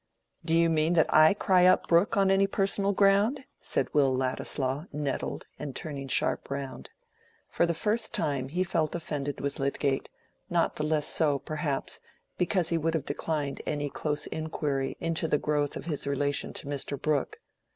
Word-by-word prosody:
"Do 165 0 +2
you 170 0 +4
mean 160 +1 +2
that 160 -2 +3
I 155 +4 +7
cry 185 -3 +4
up 185 - +4
Brooke 170 +4 +3
on 195 -1 +4
any 195 +1 +4
personal 195 0 +1
ground?" 205 +7 +3
said - - -2
Will 140 -3 +4
Ladislaw, 130 +2 -1
nettled, 145 -2 -3
and 145 -3 -6
turning 140 -3 -4
sharp - - +1
round. 140 -1 -5 0.6
For 170 - +1
the 170 - 0
first 215 +7 0
time 140 -4 -1
he 180 +5 0
felt 165 -3 -1
offended 145 -4 -4
with 140 +2 -3
Lydgate; 140 0 -1 0.4
not 170 -2 +1
the 150 - -1
less 155 -1 +1
so, 150 -4 +1
perhaps, 150 -1 -2 0.4
because 180 -1 +1
he 170 - +1
would 165 +1 0
have 150 -3 -2
declined 145 -1 -3
any 145 -1 -2
close 150 -1 -1
inquiry 145 -4 -3
into 165 -1 -1
the 150 - +2
growth 145 -1 -1
of - - -8
his 150 -4 -3
relation 140 0 0
to - - -5
Mr. 140 0 -3
Brooke. 155 - -1
155 Hz, 170 wpm, -28 LUFS, 140-170 Hz, 0.6 s, I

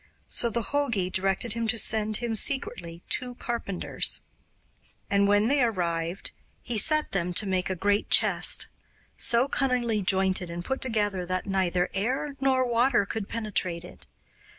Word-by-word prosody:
So 235 - +2
the 230 +1 -1
jogi 235 -8 -1
directed 195 +4 0
him 230 -1 -2
to 230 +1 +1
send 215 -1 +2
him 235 -2 -3
secretly 175 -9 -1
two 250 -1 0
carpenters; 235 -7 -1 0.9
and 200 0 +3
when 205 +2 +3
they 280 +2 +2
arrived 175 -5 -1 0.3
he 235 -3 +1
set 305 +6 +2
them 180 -2 -1
to 215 - +2
make 185 -1 -1
a 185 - -1
great 205 +3 0
chest, - - +4 0.5
so 235 +3 +2
cunningly 245 -6 0
jointed 190 -2 +1
and 170 +1 -6
put 265 - -2
together 205 -6 0
that 185 0 -2
neither 185 -2 0
air 260 +8 -2
nor 260 -1 +2
water 240 -2 +2
could 205 0 -5
penetrate 185 -6 -2
it. - - -13
210 Hz, 150 wpm, -27 LUFS, 185-240 Hz, 0.9 s, chest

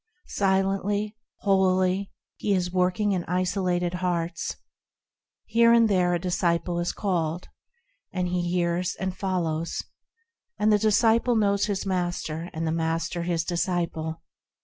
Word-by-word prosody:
Silently, 195 +2 0 0.3
holily 190 0 +2 0.3
is 195 -4 +1
He 180 - -10
working 185 +3 +2
in 180 -3 0
isolated 180 -1 0
hearts: 175 -2 -2 0.9
Here 230 0 +4
and 230 -1 +6
there 180 -3 +2
a - - -1
disciple 175 -1 0
is 175 - 0
called, 175 -4 -2 0.6
And 180 -1 -1
he 180 0 0
hears 175 0 0
and 190 -1 -3
follows; 170 -5 -2 0.7
And 215 0 +3
the 210 - +4
disciple 225 +3 +3
knows 200 -2 +2
his 200 -2 -2
Master, 175 -3 -2
and 160 +1 -3
the 160 - 0
Master 165 +1 -1
His 170 -1 0
disciple. 165 -2 -2
180 Hz, 125 wpm, -26 LUFS, 170-195 Hz, 0.9 s, and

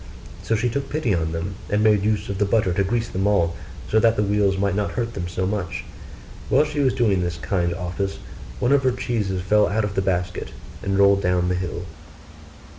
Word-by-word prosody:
So 115 - 0
she 110 +3 +1
took 135 +4 -3
pity 150 -8 0
on 80 -2 0
them, 85 +4 -3 0.2
and 105 +1 +1
made 105 -2 +4
use 105 -1 0
of 100 -1 -4
the 105 - +3
butter 100 -3 +2
to 100 - +1
grease 115 +4 -1
them 95 +2 -1
all, 85 -5 +2 0.3
so 110 - +3
that 115 0 +4
the 105 - +1
wheels 100 -1 +2
might 100 -1 +1
not 100 +1 -1
hurt 115 -1 -2
them 85 -4 -4
so 90 +1 -2
much. 90 -3 -3 0.7
While 150 - +4
she 150 -1 -4
was 135 -3 +2
doing 105 -7 +2
this 85 -1 -2
kind 85 -1 -1
office 95 +2 -3 0.4
one 120 - +1
of 140 -1 +5
her 130 -2 +2
cheeses 105 -7 -2
fell 105 +3 +4
out 110 +3 0
of 105 -1 -2
the 95 - 0
basket, 90 -1 -2 0.3
and 95 0 -1
rolled 100 0 +5
down 90 -1 +1
the - - +1
hill. 90 -1 -4
100 Hz, 220 wpm, -23 LUFS, 90-110 Hz, 0.7 s, of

